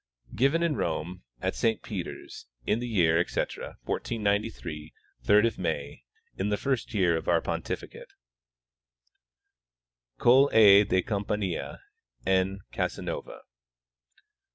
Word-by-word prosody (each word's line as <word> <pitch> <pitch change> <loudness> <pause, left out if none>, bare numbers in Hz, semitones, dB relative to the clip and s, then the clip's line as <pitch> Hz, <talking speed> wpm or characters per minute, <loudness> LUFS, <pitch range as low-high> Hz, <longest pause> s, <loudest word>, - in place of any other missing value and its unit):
Given 140 +7 +2
in 165 -3 +1
Rome, 85 +2 -3 0.2
at - - 0
Saint 115 -1 0
Peter's, 95 -6 -7 0.2
in 110 - +1
the 120 - -4
year, 85 -7 +3
etc, 85 - -3
1493, 100 -8 -2 0.3
third 105 - +5
of 115 - -1
May, 70 -7 -4 0.3
in 100 +2 -2
the 105 - 0
first 130 -3 -2
year 90 -4 +3
of 80 - -4
our - - +4
pontificate. - - -5 2.1
Coll. 135 +4 +5
A. 100 -2 +8
DE 95 -2 +1
Campania. 100 -3 -3 0.4
N, 95 +1 +1
Casanova. - - -4
100 Hz, 110 wpm, -28 LUFS, 85-115 Hz, 2.1 s, A